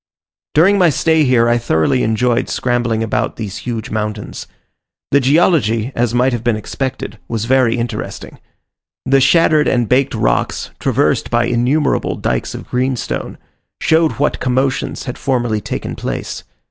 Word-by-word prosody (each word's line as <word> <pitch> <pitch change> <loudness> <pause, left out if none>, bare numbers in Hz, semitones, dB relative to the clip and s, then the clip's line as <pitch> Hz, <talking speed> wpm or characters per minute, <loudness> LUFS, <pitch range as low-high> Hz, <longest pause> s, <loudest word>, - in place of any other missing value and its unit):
During 195 +6 +5
my 180 -2 +5
stay 160 +1 +2
here 120 -3 +3
I 120 0 +2
thoroughly 115 +3 +1
enjoyed 120 +3 +1
scrambling 120 -2 0
about 110 - -1
these 105 -3 -5
huge 115 -3 -5
mountains. 105 -1 -4 0.6
The 140 - +5
geology, 135 - +2
as 120 -1 0
might 125 +1 +2
have 120 -1 -3
been 120 -2 +1
expected, 130 +5 -5
was 115 -1 -3
very 125 -2 +3
interesting. 120 0 -5 0.7
The 135 +1 +3
shattered 155 0 +4
and 120 -3 +1
baked 130 +3 +2
rocks, - - -1
traversed - - +1
by 120 0 +2
innumerable 125 +6 +1
dykes - - -2
of - - -8
greenstone, 125 0 -2 0.4
showed 160 -1 +2
what 145 +2 -1
commotions 130 +1 -1
had 125 - -6
formerly 120 -5 0
taken - - -5
place. - - -5
125 Hz, 145 wpm, -17 LUFS, 115-135 Hz, 0.7 s, During